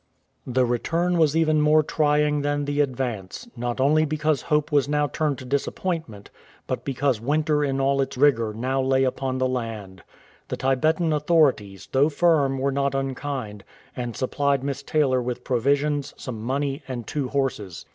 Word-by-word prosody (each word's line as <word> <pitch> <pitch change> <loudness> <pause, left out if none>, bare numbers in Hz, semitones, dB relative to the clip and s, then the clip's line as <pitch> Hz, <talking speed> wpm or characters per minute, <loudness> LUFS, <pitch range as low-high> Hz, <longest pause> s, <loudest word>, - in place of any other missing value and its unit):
The 130 0 +2
return 165 +9 0
was 160 -1 +3
even 155 -2 +3
more 155 +1 +4
trying 150 -1 +1
than 145 0 -1
the 145 +1 +1
advance, 125 - -3
not 120 +1 -3
only 150 +4 +4
because 155 -1 0
hope 150 -1 0
was 145 -1 +2
now 150 0 +2
turned 145 -1 -1
to 130 - -9
disappointment, 140 - -3 0.3
but - - -3
because 135 -4 0
winter 150 +3 +1
in 135 -1 -1
all 135 0 +2
its 135 - -3
rigour 125 -6 +3
now 130 +5 -1
lay 130 0 +2
upon 130 0 -1
the 130 0 +1
land. 110 -7 -5 0.5
The - - -4
Tibetan 155 +5 +1
authorities, 145 - +1
though 140 +3 +3
firm, 145 -4 +2
were 135 +1 0
not 140 0 0
unkind, 135 -6 -4 0.3
and 120 -2 -4
supplied 140 +1 0
Miss 140 -1 -3
Taylor 140 -3 +1
with 125 0 -4
provisions, 140 +3 0
some 115 -4 -6
money, 135 +4 -2
and 125 -3 -5
two 140 +1 -2
horses. 125 -9 -3
140 Hz, 165 wpm, -24 LUFS, 125-150 Hz, 0.5 s, more